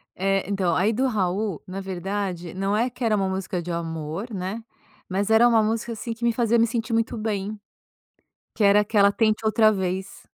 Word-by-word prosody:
É, 195 +1 0
então, 185 -4 +1
aí 200 +4 +2
do 260 +4 +1
Raul, 195 - -1
na 190 +1 -5
verdade, 190 -2 -4
não 195 +2 -1
é 235 +4 +1
que 245 0 -8
era 220 -2 +3
uma 195 -2 0
música 190 -1 -3
de 175 - -5
amor, 165 +5 -4
né, 195 +4 -4 0.4
mas 195 +3 -1
era 225 +2 +6
uma 225 -2 +4
música, 225 +2 -1
assim, 230 +1 -5
que 230 +1 -11
me 235 - +3
fazia 235 0 +2
me 230 - +5
sentir 230 0 -3
muito 230 +1 0
bem, 210 -1 -3 1.0
que 220 - 0
era 200 +1 +6
aquela 200 -1 +3
Tente 215 0 +1
Outra 215 0 +4
Vez. 190 -1 -3
205 Hz, 195 wpm, -24 LUFS, 190-225 Hz, 1.0 s, era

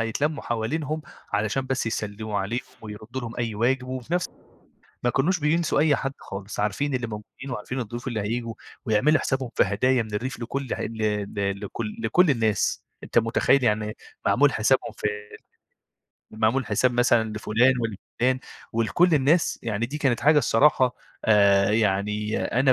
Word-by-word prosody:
يتلمّوا 140 +7 -1
حوالينهم 150 +7 -2 0.3
علشان 110 +6 0
بس 130 -3 -1
يسلّموا 105 -1 -3
عليهم 115 +6 -2 0.2
ويردّوا 110 +4 -7
لهم 115 -1 -7
أي 115 -3 -2
واجب 125 +4 +1
وفي 130 +6 -4
نفس 180 - +1 0.8
ما 120 - +2
كانوش 165 +8 +1
بينسوا 160 +2 +1
أي 150 -2 +4
حد 135 0 -3
خالص، 100 +1 -6
عارفين 130 +7 -1
اللي 120 -2 -1
موجودين 110 +5 -8
وعارفين 125 +2 -4
الضيوف 120 +3 -5
اللي 110 -4 -2
هييجوا 115 +2 -3 0.3
ويعملوا 130 +9 +3
حسابهم 130 -3 -2
في - - +4
هدايا 120 +5 +2
من 110 -1 -8
الريف 125 +5 -3
لكل 130 +2 -3
ع - - -7
ل 115 - -4 0.4
ل 100 -1 -1
لكل 110 -2 -5
لكل 145 +9 +3
الناس. 110 -5 +1 0.2
أنت - - +1
مُتخيّل 120 +3 +3
يعني 105 -1 0 0.3
معمول 140 +2 +4
حسابهم 120 +4 +1
في - - -2 1.2
معمول 110 +4 +1
حساب 130 -1 +2
مثلًا 120 -2 +3
لفُلان 110 +4 +3
ولفُلان 120 +4 -1 0.3
ولكل 140 +10 +3
الناس، 150 +4 +2
يعني 115 0 -1
دي 150 +5 -5
كانت 130 -5 +1
حاجة 150 0 +5
الصراحة 130 -1 +3 0.3
آآ 100 -2 +5
يعني 105 0 0 0.2
أنا 135 -1 +5
120 Hz, 155 wpm, -25 LUFS, 110-135 Hz, 1.2 s, حاجة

